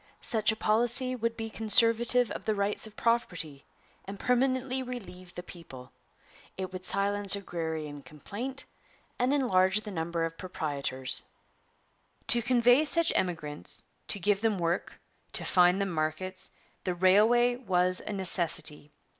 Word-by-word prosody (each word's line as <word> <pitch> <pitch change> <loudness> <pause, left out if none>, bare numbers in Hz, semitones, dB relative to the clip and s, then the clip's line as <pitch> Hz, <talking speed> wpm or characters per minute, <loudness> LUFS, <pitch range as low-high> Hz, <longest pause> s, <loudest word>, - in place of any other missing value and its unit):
Such 220 -2 +1
a - - -3
policy 240 +4 +1
would 230 -1 -2
be 225 -1 -5
conservative 230 +3 +3
of - - -6
the 215 - +1
rights 200 +2 -1
of 215 - -15
property 170 -12 -1 0.4
and 195 +1 -8
permanently 260 +1 +1
relieve 195 -8 -8
the 180 - -6
people. 135 -8 -12 0.7
It 190 0 -5
would 185 0 -7
silence 200 +1 +3
agrarian 160 -6 -5
complaint 200 - -6 0.5
and 250 +2 +2
enlarge 205 -8 +3
the 210 - -8
number 165 -1 -2
of 165 0 -7
proprietors.' 140 -7 0 1.1
To 240 - +4
convey 245 +3 +4
such 335 +2 +2
emigrants, 155 -5 0 0.2
to - - +1
give 200 +1 +1
them 220 -3 +1
work, 170 0 -2 0.3
to - - -1
find 180 0 +4
them 195 -1 -1
markets, 160 +4 -2 0.3
the 180 -2 -2
railway 220 +7 +4
was 185 -6 +1
a - - -7
necessity. 170 -6 -1
200 Hz, 140 wpm, -29 LUFS, 175-235 Hz, 1.1 s, To